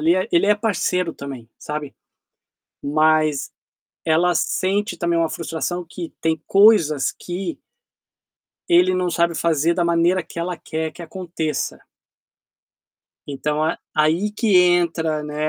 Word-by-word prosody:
ele 165 +3 +3
é 185 +4 -1
ele 170 +3 +4
é 210 - +5
parceiro 180 -5 -1
também, 135 -6 -9
sabe. 150 -2 -6 0.9
Mas 155 0 +2 0.5
ela 170 +2 +2
sente 200 +6 0
também 170 -1 0
uma 165 -1 +1
frustração 170 +2 -4
que 170 0 -8
tem 160 -1 0
coisas 195 -9 +4
que 175 -1 -6 1.1
Ele 180 +2 +5
não 180 -1 0
sabe 170 0 +1
fazer 165 0 +1
da 175 -1 0
maneira 170 +2 +2
que 165 - -11
ela 175 +1 -2
quer 160 0 -4
que 175 - -10
aconteça. 165 -3 -4 1.5
Então 150 +2 -2
a 160 +2 0 0.2
aí 160 +7 +2
que 210 -2 +2
entra, 170 -3 +2
né, 150 +1 -2
170 Hz, 130 wpm, -21 LUFS, 155-180 Hz, 1.5 s, é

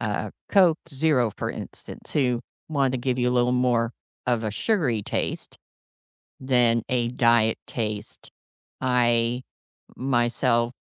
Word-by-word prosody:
uh, - - -2 0.2
Coke 180 -5 +5
Zero, 135 -5 +2
for - - -2
instance, - - -6
who 125 -4 +1 0.3
want 140 -4 +1
to 130 - -1
give 125 0 -1
you 125 0 +2
a - - +1
little 125 0 +2
more 120 -2 +1 0.3
of 120 -2 +1
a 110 - -1
sugary 125 - 0
taste, - - -3 0.8
than 120 -3 +3
a 120 -2 +1
diet 115 -2 +3
taste. 110 -2 -5 0.5
I, 120 -1 +2 0.5
myself 120 -2 +1
125 Hz, 125 wpm, -25 LUFS, 115-130 Hz, 0.8 s, Coke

